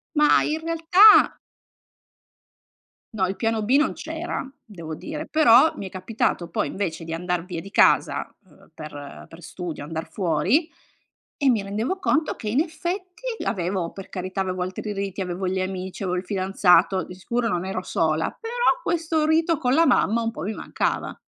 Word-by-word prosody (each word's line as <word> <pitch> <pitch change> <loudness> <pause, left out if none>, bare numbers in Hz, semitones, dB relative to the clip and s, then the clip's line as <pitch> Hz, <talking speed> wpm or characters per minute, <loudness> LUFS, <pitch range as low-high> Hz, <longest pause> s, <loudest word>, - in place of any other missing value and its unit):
Ma 300 0 +5
in 310 +1 -1
realtà 330 +6 +6 1.8
No 190 -3 0
il 190 - -3
piano 225 -1 -1
B 230 +6 +2
non 300 - +2
c'era, 325 -3 -5
devo 170 -8 -8
dire, 310 - -6
però 305 -1 +5
mi 195 - -6
è - - -8
capitato 185 -2 -2
poi, - - -1
invece, 175 -4 -4
di 165 0 -6
andar 180 0 -2
via 180 -2 -6
di 195 - -9
casa, - - +3 0.2
ehm, 170 - -22
per 145 -2 -9
per 165 +1 -14
studio 170 -2 -6
andar 160 +2 -6
fuori 190 - +1 0.7
e 280 -3 +2
mi 225 -4 +2
rendevo 220 - -3
conto 315 -4 0
che, 220 - -8
in 255 +7 +2
effetti, 360 +5 -5 0.2
l'avevo 180 -1 -2
per 195 0 -10
carità 185 +1 -4
avevo 185 -1 -3
altri 190 +3 -4
riti, 195 -1 -4
avevo 180 +1 -3
gli 190 0 -1
amici, 185 +1 -4
avevo 180 -1 -1
il 180 - -7
fidanzato, 190 0 +3
di - - -10
sicuro 235 +4 -2
non 180 -1 -2
ero 190 -1 -3
sola, 160 -1 0
però 480 +2 -4 0.2
questo 325 -4 0
rito 320 +1 +2
con 250 -1 0
la 330 +3 +5
mamma 235 -2 +3
un 230 0 -1
po' 175 - -7
mi 215 - -3
mancava. - - -2
200 Hz, 175 wpm, -24 LUFS, -, 1.8 s, realtà